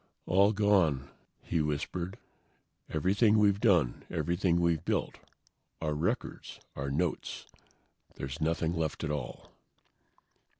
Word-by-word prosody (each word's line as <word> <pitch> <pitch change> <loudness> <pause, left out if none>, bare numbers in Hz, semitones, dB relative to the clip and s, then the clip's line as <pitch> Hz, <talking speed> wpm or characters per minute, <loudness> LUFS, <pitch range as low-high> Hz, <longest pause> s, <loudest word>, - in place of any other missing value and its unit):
"All 100 +4 +4
gone," 95 -10 +2 0.3
he 85 - 0
whispered. 85 +5 -3 0.7
"Everything 100 +7 +3
we've 100 -2 +4
done; 90 - +3
everything 85 0 +1
we've 85 -2 +1
built. - - -1 0.6
Our 75 -2 -1
records, 75 - -3 0.2
our 70 0 -3
notes. 80 +4 -2 0.7
There's 70 +4 -6
nothing 80 +1 0
left 80 -3 -2
at 75 - -1
all." 70 -5 -5
85 Hz, 110 wpm, -31 LUFS, 75-95 Hz, 0.7 s, All